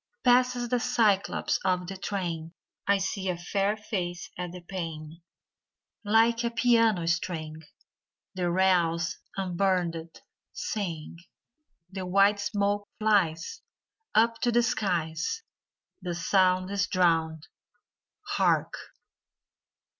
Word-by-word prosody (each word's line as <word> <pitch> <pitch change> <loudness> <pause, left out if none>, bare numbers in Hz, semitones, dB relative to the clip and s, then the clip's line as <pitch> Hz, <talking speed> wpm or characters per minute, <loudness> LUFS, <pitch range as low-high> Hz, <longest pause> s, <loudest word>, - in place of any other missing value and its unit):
Passes 250 -1 +3
the 250 0 +1
cy 230 -5 +3
clops - - -2
of 180 -1 +1
the 195 +2 -6
train! 175 -4 -4 0.3
I 200 0 +4
see 190 0 -2
a 180 - -1
fair 195 +4 0
face 180 -5 -4
at 180 -1 -5
the 180 0 -9
pane, 165 -3 -6 0.4
— - - -64
Like 225 +2 +3
a 235 - +1
piano 230 -6 +3
string 160 -2 -2 0.7
The 180 -2 -1
rails, 170 -2 +2 0.2
unburdened, 175 -3 -1 0.3
sing; 170 -7 -4 0.7
The 190 -1 -5
white 200 +2 +4
smoke 205 0 -1
flies 205 - +1 0.5
Up 230 +1 +3
to 240 - +2
the 240 0 +3
skies; 180 - -1 0.6
The 180 -2 -3
sound 185 +1 +2
Is 200 0 0
drowned 165 -4 +1 0.5
— - - -31
Hark! - - +2
190 Hz, 115 wpm, -28 LUFS, 170-210 Hz, 0.7 s, I